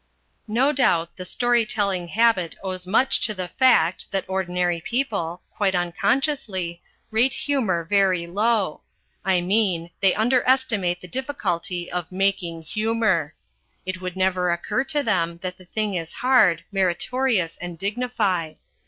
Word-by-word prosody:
No 245 +7 +2
doubt 170 - +2
the 185 - -7
story 240 +4 +2
telling 200 -5 -1
habit 205 -4 +2
owes 185 -1 -4
much 240 +7 +3
to 215 - -4
the 185 -2 -4
fact 185 -10 +3
that 195 -1 -2
ordinary 180 -2 -1
people, 200 -8 -2
quite 195 -3 +1
unconsciously, 185 - -1 0.3
rate 235 +4 +2
humour 225 -12 0
very 185 -1 +2
low: 205 -1 0 0.4
I 185 -2 +2
mean, 180 -3 0
they 195 -2 +3
underestimate 230 -6 +2
the 180 - -10
difficulty 180 - -3
of 180 -1 -4
"making 185 -3 -1
humour." 215 -4 0 0.5
It 185 0 -4
would 180 -1 -5
never 185 -1 +1
occur 175 +9 -1
to 295 -1 0
them 170 -7 0
that 185 0 -4
the 185 - -16
thing 210 +2 -2
is 165 -3 -4
hard, 255 0 +3
meritorious 195 +1 0
and 175 -1 -7
dignified. 200 -6 -1
190 Hz, 135 wpm, -23 LUFS, 175-230 Hz, 0.5 s, much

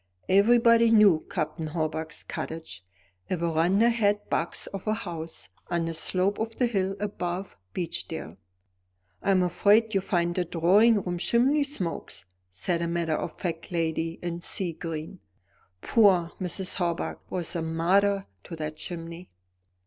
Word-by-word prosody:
Everybody 230 +3 +5
knew 210 -8 +5
Captain 155 -1 -3
Hawbuck's 160 0 -3
cottage, 160 - -6 0.5
a 185 - 0
verandahed 200 +6 +2
box 165 - -1
of 195 +1 -7
a 215 - +2
house, 165 - -6 0.2
on 170 -1 0
the 165 - -3
slope 185 +5 0
of 225 0 -3
the 250 - +3
hill 195 -4 0
above 190 -2 -4 0.2
Beechdale. 165 -2 -5 0.8
"I'm 190 -2 +3
afraid 210 +5 +3
you'll 195 - +2
find 175 -2 0
the 180 - 0
drawing 190 +6 +4
room 175 -1 -3
chimney 265 - +3
smokes," 175 - -4 0.2
said 165 - -2
a 170 - 0
matter 170 -1 -1
of 155 - -3
fact 165 -2 -4
lady 165 -1 -1
in 175 0 -3
sea 175 -1 -1
green; 165 +2 -6 0.6
"poor 190 -7 +4
Mrs. 185 +1 -2
Hawbuck 170 -2 -2
was 180 -1 -3
a 170 - -1
martyr 190 +5 +2 0.2
to 165 - -7
that 155 -1 -5
chimney." 170 0 -7
175 Hz, 140 wpm, -27 LUFS, 165-200 Hz, 0.8 s, Everybody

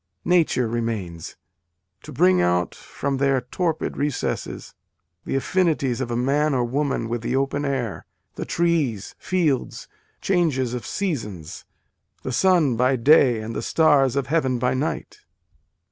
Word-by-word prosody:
Nature 165 -9 +2
remains: 110 -8 -4 0.7
to - - -11
bring 90 -1 +3
out 90 0 +1
from 140 -1 -4
their 135 -1 +2
torpid 160 +6 -2
recesses, 145 -2 -3 0.5
the - - -2
affinities 140 -5 0
of 125 - -3
a 120 - -2
man 140 +4 +1
or 125 - +1
woman 135 -1 -1
with 120 0 -3
the 120 +2 -2
open 140 +2 0
air, 130 -7 -3 0.3
the - - -5
trees, 155 - 0
fields, 160 -9 -1 0.3
changes 150 -10 0
of 120 -4 -5
seasons 105 - -4 0.6
the 130 - -3
sun 165 -2 +3
by 125 +3 +2
day 125 -2 +4
and 110 +1 -6
the - - -2
stars 140 -2 +3
of 140 -2 0
heaven 135 -5 +1
by 125 +1 0
night." 135 +4 -3
130 Hz, 140 wpm, -23 LUFS, 115-150 Hz, 0.7 s, day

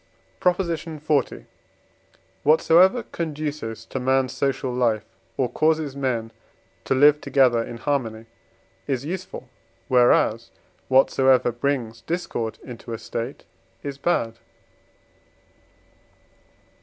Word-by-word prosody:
PROP. 180 0 +2
XL. 165 -2 -4 1.5
Whatsoever 175 - +5
conduces 150 -8 -4
to 130 - -5
man's 130 0 +1
social 135 -2 -1
life, 115 -4 +1 0.3
or 130 - +1
causes 155 0 0
men 120 -5 -2 0.5
to 135 - +1
live 145 +2 +5
together 125 -5 +3
in 115 - -8
harmony, 115 -4 -2 0.6
is 135 -1 -2
useful, 185 +3 -6 0.4
whereas 120 -2 +3 0.4
whatsoever 130 -1 +4
brings 120 -2 -2
discord 170 -10 -3
into 120 -1 -8
a - - -3
State 115 +5 -5 0.4
is 140 -1 -6
bad. 115 -9 0
135 Hz, 95 wpm, -23 LUFS, 120-150 Hz, 1.5 s, Whatsoever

